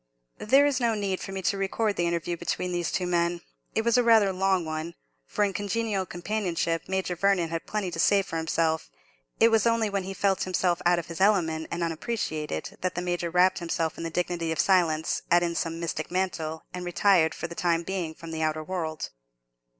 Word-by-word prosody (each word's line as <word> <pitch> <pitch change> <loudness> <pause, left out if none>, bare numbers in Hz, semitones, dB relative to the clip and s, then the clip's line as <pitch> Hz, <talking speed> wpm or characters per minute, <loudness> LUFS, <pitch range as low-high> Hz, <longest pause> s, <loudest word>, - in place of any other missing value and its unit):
There 270 +6 +5
is 285 -3 +1
no 235 -2 +1
need 195 -3 -1
for - - -6
me 190 -1 -5
to 195 - 0
record 205 +2 0
the 175 - +1
interview 170 0 -1
between 175 +1 -2
these 175 -1 -1
two 180 - -1
men. 170 -1 0 0.3
It 220 - +2
was 235 +1 +3
rather 225 -4 +5
a - - -2
long 190 -2 +1
one; 155 +2 -4 0.3
for, 210 - 0
in 200 -1 +1
congenial 205 -1 -1
companionship, 175 -3 -2
Major 190 -1 -1
Vernon 185 -2 +2
had 165 0 -4
plenty 210 -4 -2
to 165 - -5
say 200 +3 +4
for 165 - -5
himself: 160 - 0 0.5
it 230 - +7
was 225 0 +3
only 230 -2 +2
when 200 -1 0
he 195 +1 -6
felt 195 -1 +1
himself 180 -1 0
out 175 0 +4
of 170 - -3
his 170 +2 -7
element 165 -6 +2
and 170 0 -2
unappreciated 160 - -3
that 185 0 -1
the 175 - -1
Major 175 -1 -1
wrapped 180 +2 +3
himself 165 -2 -2
in - - -6
the 165 - -2
dignity 170 -1 -1
of 160 - -3
silence, 170 -5 +2
as 175 0 +5
in 170 -1 0
some 165 0 -2
mystic 160 -2 -3
mantle, 170 -4 -2
and 180 0 -5
retired 175 -2 +3
for - - -5
the 170 - -5
time 170 -1 +1
being 175 -3 -3
from 165 0 -9
the 160 0 -3
outer 155 0 0
world. 160 -3 -4
175 Hz, 210 wpm, -27 LUFS, 165-195 Hz, 0.5 s, it